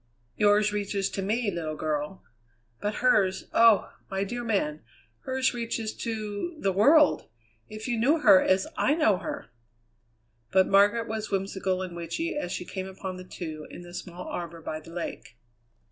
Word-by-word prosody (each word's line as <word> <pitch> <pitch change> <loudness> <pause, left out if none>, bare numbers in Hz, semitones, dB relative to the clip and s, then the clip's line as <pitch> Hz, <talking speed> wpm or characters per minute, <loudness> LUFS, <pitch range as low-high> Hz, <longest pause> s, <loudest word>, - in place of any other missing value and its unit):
"Yours 210 0 +3
reaches 200 -1 -1
to 195 - -3
me, 215 +2 0
little 160 -3 -4
girl." 150 +3 -3 0.6
"But 210 +1 -2
hers 195 -6 +3
oh! 230 -3 +5 0.2
my 195 0 -1
dear 240 +4 -4
man, 175 -10 0 0.4
hers 260 0 +1
reaches 230 -2 -3
to 220 +7 -4
the 195 - +1
world. 285 - +5 0.4
If 215 +2 -7
you 240 -2 0
knew 280 +8 +4
her 200 -7 +8
as 190 0 +2
I 295 - +2
know 220 - +3
her!" 115 - -6 1.0
But 190 0 +5
Margaret 205 +4 +4
was 220 -1 -4
whimsical 190 -1 -1
and 180 -2 -7
witchy 235 - -3
as 240 -12 -3
she 180 - -4
came 190 0 -5
upon 190 -1 -6
the 185 - -8
two 155 -4 -7
in 175 - -10
the 175 0 -12
small 180 0 -7
arbour 170 -1 -5
by 155 0 -4
the 155 - -14
lake. 115 -9 -6
195 Hz, 165 wpm, -27 LUFS, 180-225 Hz, 1.0 s, her